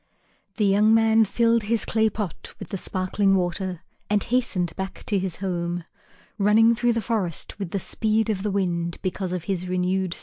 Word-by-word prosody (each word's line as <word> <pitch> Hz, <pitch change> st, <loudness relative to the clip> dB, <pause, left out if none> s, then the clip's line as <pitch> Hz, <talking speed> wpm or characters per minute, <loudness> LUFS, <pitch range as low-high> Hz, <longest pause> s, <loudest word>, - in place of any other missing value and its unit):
The 215 Hz, -, +2 dB
young 210 Hz, +3 st, +4 dB
man 225 Hz, 0 st, +4 dB
filled 230 Hz, +3 st, +2 dB
his 220 Hz, +2 st, 0 dB
clay 220 Hz, -1 st, +2 dB
pot 205 Hz, -5 st, -6 dB
with -, -, -9 dB
the 195 Hz, -, -3 dB
sparkling 195 Hz, +2 st, +1 dB
water 180 Hz, -1 st, -2 dB, 0.3 s
and 210 Hz, -1 st, +2 dB
hastened 215 Hz, -8 st, -1 dB
back 190 Hz, 0 st, -6 dB
to 200 Hz, -, 0 dB
his 185 Hz, -3 st, -3 dB
home, 175 Hz, -2 st, -3 dB, 0.6 s
running 220 Hz, +3 st, +5 dB
through 240 Hz, +1 st, +1 dB
the 230 Hz, -, -1 dB
forest 200 Hz, -5 st, -1 dB
with 195 Hz, -4 st, -4 dB
the 200 Hz, -, -2 dB
speed 220 Hz, +3 st, 0 dB
of 195 Hz, -3 st, -3 dB
the 210 Hz, -, -1 dB
wind, 175 Hz, -4 st, -1 dB
because 185 Hz, -1 st, -2 dB
of 180 Hz, -2 st, -3 dB
his 185 Hz, -1 st, -3 dB
renewed 185 Hz, 0 st, 0 dB
strength. -, -, -9 dB
195 Hz, 190 wpm, -24 LUFS, 180-220 Hz, 0.6 s, running